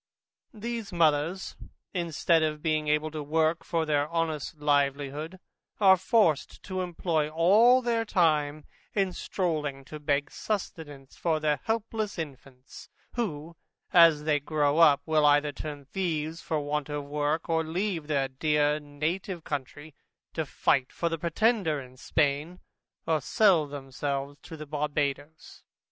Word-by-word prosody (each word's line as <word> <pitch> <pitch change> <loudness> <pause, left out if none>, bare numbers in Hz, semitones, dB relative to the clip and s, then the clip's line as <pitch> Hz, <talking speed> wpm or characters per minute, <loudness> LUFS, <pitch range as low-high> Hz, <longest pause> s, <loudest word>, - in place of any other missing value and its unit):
These 230 -1 -5
mothers, 165 +2 +1 0.4
instead 170 -2 +1
of 150 -1 -1
being 155 -2 0
able 150 +1 +1
to 155 -1 -5
work 160 +2 +1
for 165 -1 -1
their 145 -1 +1
honest 160 -3 -2
livelihood, 145 +3 0 0.4
are 190 -2 +7
forced 190 -4 +1
to 185 -1 -3
employ 170 -3 -1
all 210 +11 +5
their 230 -1 +1
time 155 -7 +1 0.3
in 195 -3 +1
stroling 150 -9 -2
to 155 +2 -8
beg 145 -1 0
sustenance 155 -9 -5
for 160 -2 0
their 150 -2 +1
helpless 220 -2 -2
infants 135 -4 -9 0.2
who, 170 -8 -4 0.4
as 165 -4 +7
they 150 -1 +2
grow 145 +1 +1
up, 150 -3 +5
either 150 -1 +4
turn 145 -1 -7
thieves 160 -1 -3
for 155 - -1
want 145 0 -2
of 145 -1 -4
work, 150 +2 -1
or 165 -1 +1
leave 170 -1 -2
their 140 -3 +1
dear 150 +2 +1
native 160 +5 -4
country, 145 +2 -6 0.4
to 160 -2 -2
fight 135 -2 +1
for 170 - -1
the 165 -1 -3
Pretender 170 -1 +1
in 130 -1 -11
Spain, 150 +5 -1 0.5
or 160 -2 +1
sell 175 0 +3
themselves 140 0 -4
to 160 - -10
the 155 - -7
Barbadoes. 145 +1 -3
155 Hz, 135 wpm, -28 LUFS, 145-170 Hz, 0.5 s, are